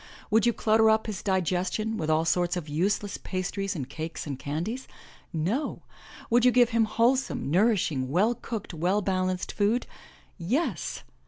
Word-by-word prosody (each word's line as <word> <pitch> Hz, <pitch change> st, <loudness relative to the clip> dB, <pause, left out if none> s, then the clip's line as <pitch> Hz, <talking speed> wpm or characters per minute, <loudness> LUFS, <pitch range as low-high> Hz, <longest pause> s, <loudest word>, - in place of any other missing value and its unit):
Would 220 Hz, +1 st, +4 dB
you -, -, +5 dB
clutter 220 Hz, 0 st, +4 dB
up 220 Hz, 0 st, +3 dB
his 215 Hz, -3 st, -4 dB
digestion 190 Hz, +3 st, 0 dB
with 160 Hz, -6 st, -3 dB
all 155 Hz, +1 st, +2 dB
sorts 175 Hz, +1 st, +1 dB
of 165 Hz, -3 st, -5 dB
useless 195 Hz, +7 st, -1 dB
pastries 195 Hz, +1 st, -3 dB
and 135 Hz, -6 st, -4 dB
cakes 160 Hz, +1 st, -6 dB
and 140 Hz, -3 st, -5 dB
candies? 175 Hz, -, -4 dB, 0.4 s
No! 190 Hz, -, -2 dB, 0.5 s
Would 240 Hz, +1 st, +4 dB
you 250 Hz, -, +7 dB
give 245 Hz, -1 st, +5 dB
him 230 Hz, -1 st, +3 dB
wholesome, 235 Hz, -, +1 dB
nourishing, 175 Hz, -, +2 dB
well 200 Hz, -, +3 dB
cooked, 225 Hz, -5 st, -6 dB
well 180 Hz, +6 st, +1 dB
balanced 185 Hz, -1 st, -1 dB
food? 215 Hz, +4 st, +1 dB, 0.5 s
Yes! 245 Hz, -, -1 dB
195 Hz, 155 wpm, -27 LUFS, 170-225 Hz, 0.5 s, you